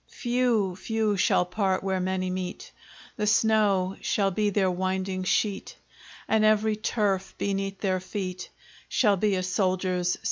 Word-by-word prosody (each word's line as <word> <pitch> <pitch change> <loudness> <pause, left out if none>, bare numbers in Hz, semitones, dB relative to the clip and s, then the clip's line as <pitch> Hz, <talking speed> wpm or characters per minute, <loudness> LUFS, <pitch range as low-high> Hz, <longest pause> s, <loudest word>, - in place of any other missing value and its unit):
Few, 240 -6 0
few 220 0 0
shall 180 -1 +2
part 190 0 -1
where 190 -1 0
many 185 0 -1
meet! 185 0 -5 0.5
The 210 -2 -1
snow 205 -4 +2
shall 195 -2 +1
be 210 +3 +1
their 195 -2 +1
winding 185 +1 -2
sheet, 200 +1 -1 0.5
And 220 -1 +2
every 215 0 +3
turf 200 -3 -1
beneath 195 -1 -2
their 185 -2 +1
feet 185 -1 -5 0.4
Shall 210 -5 +3
be 205 +1 +1
a 185 - -1
soldier's 185 -1 0
sepulchre. - - -7
195 Hz, 145 wpm, -26 LUFS, 185-210 Hz, 0.5 s, every